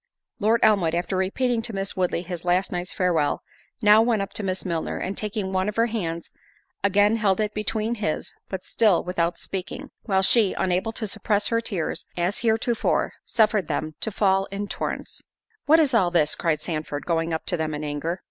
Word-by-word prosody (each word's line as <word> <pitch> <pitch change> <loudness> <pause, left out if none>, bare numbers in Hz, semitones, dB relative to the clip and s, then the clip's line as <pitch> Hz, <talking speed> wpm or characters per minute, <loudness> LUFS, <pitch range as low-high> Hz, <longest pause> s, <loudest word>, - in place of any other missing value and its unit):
Lord 220 +3 +3
Elmwood, 195 -7 +4
after 175 +2 -1
repeating 225 +6 0
to 225 0 -5
Miss 195 0 -2
Woodley 180 -2 0
his 175 -2 -6
last 180 +2 +1
night's 180 +1 -3
farewell, 170 -5 +1 0.4
now 210 +1 +7
went 225 -3 +2
up 195 - -8
to - - -1
Miss 190 -1 -2
Milner, 170 -3 -2
and 190 +2 -3
taking 205 -2 -3
one 190 +2 +1
of 210 - -5
her 230 - +3
hands, 170 -8 -3 0.5
again 205 +2 +4
held 200 -3 +2
it 215 -1 0
between 215 +1 -1
his, 205 -9 -2 0.2
but 190 -1 -5
still 210 -7 +3
without 175 -1 -1
speaking—while 190 +1 -3
she, 215 0 +4
unable 185 +4 0
to 225 - -3
suppress 205 0 0
her 230 0 +1
tears 190 -8 -3
as 175 +3 0
heretofore, 230 0 +1
suffered 215 -6 +2
them 155 0 -2
to - - 0
fall 195 -1 +2
in 200 +1 -5
torrents. - - -4 0.5
"What 320 +2 +7
is 290 -5 +3
all 190 -7 +4
this?" 160 -4 +2
cried 160 -3 0
Sandford, 155 -3 -4
going 165 -1 0
up 160 - -2
to 180 - +1
them 155 -2 -2
in 150 - -5
anger. 150 +4 -3
195 Hz, 190 wpm, -24 LUFS, 175-215 Hz, 0.5 s, now